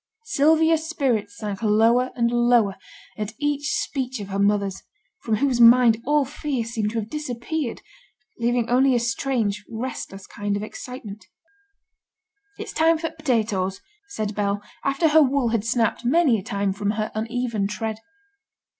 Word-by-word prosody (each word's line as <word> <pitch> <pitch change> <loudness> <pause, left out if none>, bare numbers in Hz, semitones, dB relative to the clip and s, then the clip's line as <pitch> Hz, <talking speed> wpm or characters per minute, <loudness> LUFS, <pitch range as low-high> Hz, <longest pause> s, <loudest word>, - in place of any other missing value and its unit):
Sylvia's 320 -3 +3
spirits 230 -10 -1
sank 205 -2 -5
lower 230 +4 +3
and 235 -1 +1
lower 240 -4 +3 0.4
at 210 0 -3
each 290 0 -1
speech 260 -3 -2
of 200 -1 -7
her 195 0 -3
mother's, 200 -1 +1 0.4
from 220 - 0
whose 250 +1 +1
mind 235 -1 +7
all 295 -1 +3
fear 275 -3 -3
seemed 220 -2 -2
to 230 - -4
have 210 - -5
disappeared, 275 0 -4 0.6
leaving 240 0 +1
only 255 +1 +3
a - - +3
strange 230 -3 -1
restless 225 -4 -6
kind 205 0 -3
of 205 - -5
excitement. 215 -3 -9 1.3
'It's - - -7
time 325 +1 +3
for 325 +1 -3
t' - - -24
potatoes,' 215 -10 -1 0.3
said 215 - -4
Bell, 205 0 -1 0.2
after 275 +4 +2
her 315 +1 +6
wool 275 -3 +2
had 225 -2 0
snapped 230 0 0
many 260 -2 +3
a - - -9
time 200 0 -1
from 205 +1 -1
her 215 0 -2
uneven 225 -2 -2
tread. 215 +2 -4
235 Hz, 155 wpm, -23 LUFS, 210-270 Hz, 1.3 s, mind